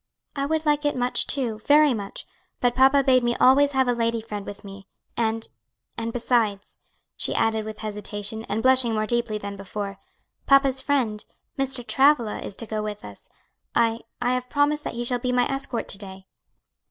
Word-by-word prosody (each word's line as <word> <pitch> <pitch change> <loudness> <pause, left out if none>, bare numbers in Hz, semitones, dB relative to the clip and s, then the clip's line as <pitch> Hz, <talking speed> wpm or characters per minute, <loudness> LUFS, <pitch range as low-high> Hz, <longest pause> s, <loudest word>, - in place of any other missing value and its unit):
"I 280 -1 -1
would 315 +1 -1
like 295 0 +2
it 290 - 0
much 250 0 +1
too, 240 -6 -1
very 290 +4 +5
much, 200 -3 -6 0.3
but 245 -1 +2
papa 270 +2 +5
bade 255 -2 +4
me 240 0 +1
always 280 +2 +5
have 265 -1 +2
a 245 - +3
lady 230 -1 0
friend 210 -2 -7
with 205 0 -8
me; 195 -1 -11 0.3
and 225 -1 -1 0.5
and 230 0 -3
besides," 225 -4 -1 0.4
she - - -1
added 220 -1 +1
with 215 -1 -7
hesitation, 210 0 -5
and 220 +2 -3
blushing 255 -3 +4
more 215 0 0
deeply 235 -1 -1
than 200 -1 -6
before, 195 0 -6 0.5
"papa's 275 -1 +4
friend. 245 -7 0 0.3
Mr. 270 -3 -1
Travilla, 240 -1 +3
is 195 - -7
to 230 - -2
go 215 0 -3
with 210 -1 -6
us. 100 -1 -13 0.5
I 230 -1 +2 0.2
I 245 +1 +1
have 250 0 -3
promised 295 +1 +1
that - - -4
he 240 - -2
shall 245 0 0
be 250 +1 -1
my 250 0 +3
escort 270 -3 -3
to 195 - -2
day." 190 -2 -10
235 Hz, 190 wpm, -24 LUFS, 215-265 Hz, 0.5 s, very